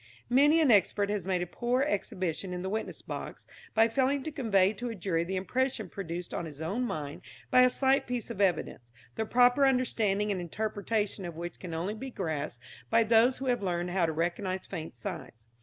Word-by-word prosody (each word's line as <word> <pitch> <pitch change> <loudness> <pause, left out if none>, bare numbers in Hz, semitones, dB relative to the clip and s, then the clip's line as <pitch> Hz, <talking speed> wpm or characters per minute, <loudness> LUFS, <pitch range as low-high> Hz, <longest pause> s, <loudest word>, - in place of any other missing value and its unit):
Many 295 +5 +6
an 290 -6 +5
expert 205 0 +3
has 205 -3 -2
made 180 -2 +1
a - - -3
poor 240 +8 0
exhibition 185 - -2
in 180 0 -4
the 190 - -3
witness 220 +1 -4
box - - -7 0.3
by 225 0 +6
failing 265 +4 +1
to 315 - -4
convey 210 -8 +2
to 240 +3 -5
a 225 - -5
jury 175 -3 0
the 185 +3 -3
impression 225 +2 -1
produced 175 -2 -6
on 170 - -2
his 150 -3 -9
own 195 +11 -1
mind 150 -9 -4 0.3
by 255 - +7
a 255 - +7
slight 265 +2 +2
piece 245 -3 -3
of 200 - -4
evidence, 160 -10 0 0.2
the 220 -1 -3
proper 245 +4 +5
understanding 220 -6 +2
and 185 -2 -2
interpretation 205 +2 -2
of 170 -2 -6
which 170 +1 -6
can 170 -3 -6
only 180 +6 -2
be 265 +5 -6
grasped 155 - -4 0.3
by 230 - +5
those 230 +3 +4
who 270 - -5
have 245 -3 +1
learned 175 -2 -1
how 175 -2 +2
to - - 0
recognize 180 +4 -2
faint 165 -7 -6
signs. 115 -1 -7
200 Hz, 205 wpm, -30 LUFS, 175-245 Hz, 0.3 s, by